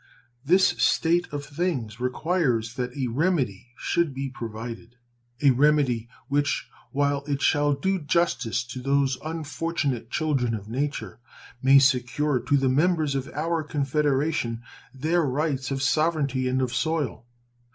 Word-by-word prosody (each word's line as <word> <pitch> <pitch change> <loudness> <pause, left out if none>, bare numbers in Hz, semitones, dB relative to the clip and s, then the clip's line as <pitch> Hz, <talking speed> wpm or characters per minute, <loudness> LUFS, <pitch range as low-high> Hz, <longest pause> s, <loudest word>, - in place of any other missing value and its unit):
This 185 +6 +5
state 170 +2 +3
of 145 -1 -4
things 140 - -3
requires 125 -3 0
that 125 +1 -4
a 135 - 0
remedy 125 - 0
should 170 -5 0
be 135 0 -3
provided 115 0 -7 0.5
a 140 - +7
remedy 130 -4 +2 0.2
which, 145 0 0 0.2
while 145 0 +1
it 140 -1 -1
shall 145 -1 +3
do 190 +7 0
justice 145 -7 0
to 125 +1 -7
those 135 -1 +1
unfortunate 155 -5 -3
children 135 -7 0
of 100 -1 -8
nature, 120 -5 -3 0.4
may 135 +1 +7
secure 135 +1 +2
to 140 - +1
the 135 -1 +1
members 155 +2 +2
of 135 +1 -3
our 165 +2 0
confederation 145 -4 0 0.3
their 155 +7 +1
rights 140 -2 -1
of 135 -1 -2
sovereignty 140 -3 +1
and 130 +1 +1
of 125 -1 -2
soil. 135 -2 -1
140 Hz, 135 wpm, -25 LUFS, 125-155 Hz, 0.5 s, a